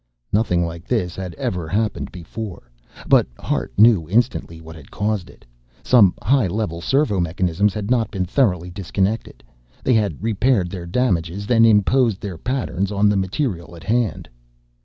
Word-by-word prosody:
Nothing 90 -5 +2
like 85 +1 -8
this 90 -8 -1
had 90 -3 -6
ever 90 -3 -3
happened 105 +4 -2
before. 90 - -8 0.4
But - - +5
Hart - - -2
knew 105 -7 +5
instantly 100 -6 0
what 80 0 -11
had 75 -4 -14
caused 105 -3 -2
it. - - -18 0.4
Some 105 -8 +5
high 130 -4 +3
level 90 -3 -3
servo 135 - +1
mechanisms 90 +3 0
had 105 +1 -3
not 120 -3 +2
been 95 -2 -2
thoroughly 90 - 0
disconnected. 95 +3 -2 0.4
They 130 - +2
had 105 -3 0
repaired 110 -4 +1
their 90 -3 -6
damages, 95 -3 -1
then 115 0 +4
imposed 110 +1 +3
their 95 -5 -6
patterns 110 - -2
on 105 0 +3
the 105 - +2
material 95 - -2
at 85 - -12
hand. 115 -1 -1
100 Hz, 160 wpm, -21 LUFS, 90-115 Hz, 0.4 s, But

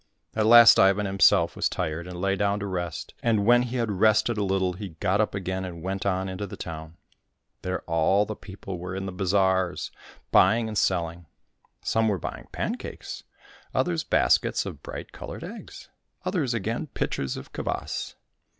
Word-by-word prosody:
At 110 -1 +2
last 120 0 +9
Ivan 100 +2 +4
himself 95 0 +4
was - - +1
tired, 80 +3 -3
and 90 -1 -7
lay 95 +1 +1
down 100 0 0
to - - -2
rest, 90 -5 -4
and 110 -4 +2
when 120 +2 +6
he 125 0 -3
had 115 -3 0
rested 110 +4 +3
a 105 - 0
little, 95 -1 +1
he 100 +2 -7
got 100 +1 +2
up 105 - -1
again 95 -1 -3
and 85 -3 -7
went 95 +1 -2
on 95 0 0
into 95 +2 -4
the - - -9
town. 80 0 -7 0.6
There 90 0 -3
all 85 +5 +2
the 110 +1 -5
people 95 -2 -8
were 90 +1 -5
in 95 0 -3
the 95 - -4
bazaars, 95 -1 +1 0.4
buying 110 +5 +5
and 110 - -5
selling. 85 -4 0 0.6
Some 110 0 +2
were 105 -3 +1
buying - - -6
pancakes, - - -5 0.5
others 85 -2 +1
baskets - - +2
of - - -7
bright - - -8
coloured - - -8
eggs, - - -9 0.4
others 160 - 0
again 115 +7 -2
pitchers 70 - -3
of - - -10
kvas. - - -4
95 Hz, 175 wpm, -26 LUFS, 90-105 Hz, 0.6 s, last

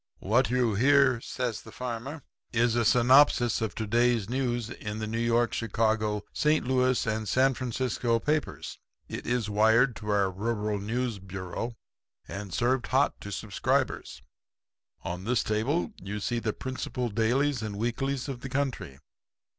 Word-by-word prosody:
"'What 120 +6 +2
you 125 -3 +2
hear,' 130 +2 +4
says 120 -3 -3
the 110 - -13
farmer, 125 +5 -5 0.3
'is 120 0 +2
a 120 - +2
synopsis 125 0 +5
of 110 - -2
to 110 - -3
day's 120 -1 +2
news 120 -2 -1
in 105 -2 -6
the 110 - -3
New 110 +1 -3
York, 115 0 +2
Chicago, 110 -1 0
St. 150 -2 +2
Louis 130 -1 +2
and 110 -1 -2
San 135 +1 +3
Francisco 125 -1 -1
papers. 150 +5 -2 0.3
It - - -6
is 120 -3 0
wired 110 +5 +4
in - - -11
to 105 -1 -8
our 100 -2 +2
Rural 105 +1 -2
News 115 +1 -2
Bureau 95 +5 -5 0.5
and 100 -1 -6
served 120 +6 +1
hot 135 +2 +1
to 100 - -7
subscribers. 95 - -1 0.8
On 90 +1 -4
this 120 +1 +1
table 135 - 0
you 105 +2 -4
see 120 +3 -1
the 110 -2 -1
principal 125 0 -4
dailies 120 +5 +1
and 105 -2 -4
weeklies 130 +4 -2
of 130 -3 -5
the 135 - -6
country. 130 - -2
115 Hz, 155 wpm, -28 LUFS, 105-130 Hz, 0.8 s, synopsis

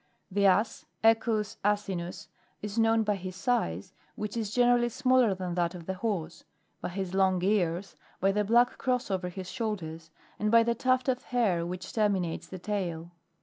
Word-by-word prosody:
19. 200 +2 0
The - - +7
.Ass, 210 +4 +2 0.2
Equus 225 -1 +2
rfsinus, 195 -4 -1 0.4
is 210 +2 -2
known 225 0 +4
by 210 -1 +1
his 185 -1 -6
size, 100 - -1 0.2
which 210 +1 -4
is 220 -3 -2
generally 240 +1 +3
smaller 255 -4 +3
than 180 -1 -4
that 175 0 0
of 170 -2 -9
the 190 - -2
horse; 185 -5 -3 0.4
by - - -3
his 185 0 -4
long 190 -2 +2
ears; 190 -2 0 0.2
by 195 +1 +3
the 210 +1 +1
black 240 +4 +3
cross 250 -4 0
over 185 -1 -1
his 185 0 -7
shoulders, 165 -8 -4 0.3
and 210 - +1
by 230 +1 +6
the 235 0 +1
tuft 255 +2 +1
of 255 -1 +1
hair 195 -9 +1
which 180 +1 -5
termi 210 -4 +1
nates 170 -1 -4
the 190 - -6
tail. 175 -4 -3
200 Hz, 185 wpm, -29 LUFS, 180-225 Hz, 0.4 s, The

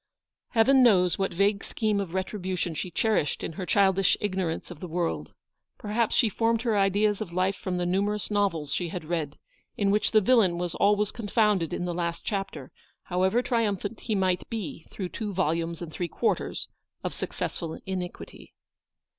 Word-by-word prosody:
Heaven 260 +4 +5
knows 185 -8 +5
what 195 - 0
vague 200 +3 +1
scheme 215 -2 0
of 195 -3 -2
retribu 190 -1 -2
tion 170 -1 -1
she 180 - -4
cherished 175 -3 0
in - - -3
her 180 +2 -5
childish 195 -1 +4
ignorance 185 -5 -2
of 170 - -9
the 180 - -6
world. 155 - -2 0.4
Perhaps 215 +2 0
she 235 - +5
formed 225 +2 +1
her 230 -3 +1
ideas 205 +1 +2
of 185 - -4
life 185 +2 +1
from 185 -2 -3
the 175 - 0
numerous 200 +3 0
novels 195 -8 0
she 175 - -1
had 170 -1 -5
read, 155 -3 -2 0.4
in 200 -1 +2
which 210 +1 +2
the 220 - +5
villain 210 -5 +4
was 175 -1 -2
always 205 0 +2
confounded 210 -6 +1
in 175 - -2
the 175 - -2
last 170 -1 -3
chapter, 195 -10 -3 0.3
however 190 +7 +1
triumphant 215 -3 -1
he 220 - -2
might 185 -2 0
be 210 -8 -5
through 185 -3 -5
two 210 +1 -4
volumes 170 -1 0
and 165 - -7
three 175 - -2
quarters - - -1 0.4
of - - -2
suc - - -4
cessful 160 -1 -4
iniquity. 185 -2 -6
190 Hz, 180 wpm, -27 LUFS, 175-210 Hz, 0.4 s, Heaven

